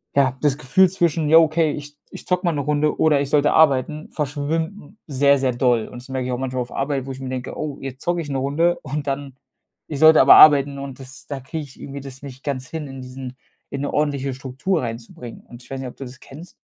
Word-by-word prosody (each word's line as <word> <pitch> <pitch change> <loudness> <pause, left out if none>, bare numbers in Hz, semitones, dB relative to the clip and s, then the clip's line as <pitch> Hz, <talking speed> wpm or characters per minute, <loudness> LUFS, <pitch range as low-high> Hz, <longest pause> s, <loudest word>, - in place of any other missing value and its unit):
ja, 130 -2 +2
das 145 -2 +2
Gefühl 185 +7 +4
zwischen: 165 -4 0
„Jo, 165 +1 +8
okay, 160 0 +2
ich 145 0 -8 0.2
ich - - -10
zocke 180 0 0
mal 170 - +3
'ne 145 - -2
Runde 150 +1 0
oder 155 -3 +4
ich 140 - -3
sollte 150 0 +3
arbeiten", 150 0 +2
verschwimmt 160 +6 -3
sehr, 140 0 +3
sehr 130 -2 0
doll. 120 -2 +1
Und 125 - -10
das 135 - -15
merke 130 -1 -3
ich 130 - -3
auch 125 - -1
manchmal 130 -1 -3
auf 125 - -7
Arbeit, 135 -1 -2
wo 135 - -6
ich 130 - -8
mir 130 - -5
denke: 130 -1 -5
„Oh, 150 -3 -4
jetzt 135 -1 -7
zocke 175 0 -1
ich 150 - -7
'ne 135 - -2
Runde 160 +6 +1
und 145 0 -4
dann" 135 -1 -4 0.5
ich 145 - -5
sollte 160 +1 +7
aber - - +8
arbeiten 140 -2 +7
und 135 -2 -8
das 135 +1 -11
da 140 -2 -5
kriege 150 +4 -6
ich 130 - -17
irgendwie 140 0 -7
das 135 -1 -10
nicht 130 -2 -10
ganz 130 -3 -4
hin, 160 -3 -5
in 135 -1 -9
diesen 125 0 -8 0.3
in 140 - -5
'ne 145 - -2
ordentliche 140 -2 0
Struktur 135 +7 -2
reinzubringen. 115 0 -8
Und 120 +1 -13
ich - - -18
weiß 135 - -4
nicht, 130 - -5
ob - - -14
du - - -7
das 130 +1 -11
kennst? 155 +7 -13
140 Hz, 250 wpm, -21 LUFS, 130-150 Hz, 0.5 s, Jo